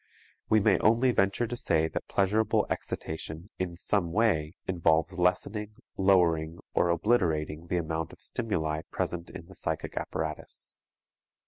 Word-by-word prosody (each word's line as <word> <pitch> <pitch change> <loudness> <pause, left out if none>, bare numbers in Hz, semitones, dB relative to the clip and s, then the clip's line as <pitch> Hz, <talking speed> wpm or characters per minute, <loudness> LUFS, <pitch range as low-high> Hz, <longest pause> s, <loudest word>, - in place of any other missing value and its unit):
We 110 - +5
may 100 -1 +4
only 120 +4 +4
venture 100 +2 +2
to 120 +1 -4
say 80 -8 +1
that - - -5
pleasurable 105 +3 +2
excitation 80 +4 -5
in 90 -2 -2
some 90 -1 0
way 90 -6 +2
involves 80 -3 +2
lessening, 105 +4 0 0.2
lowering 85 -4 +3 0.2
or 85 - +3
obliterating 85 -4 +1
the 90 - 0
amount 80 -1 -2
of - - -14
stimuli 80 -9 -2
present 85 -1 -3
in 85 - -9
the 95 - -14
psychic - - -2
apparatus. 80 -1 -4
90 Hz, 135 wpm, -29 LUFS, 80-105 Hz, 0.2 s, We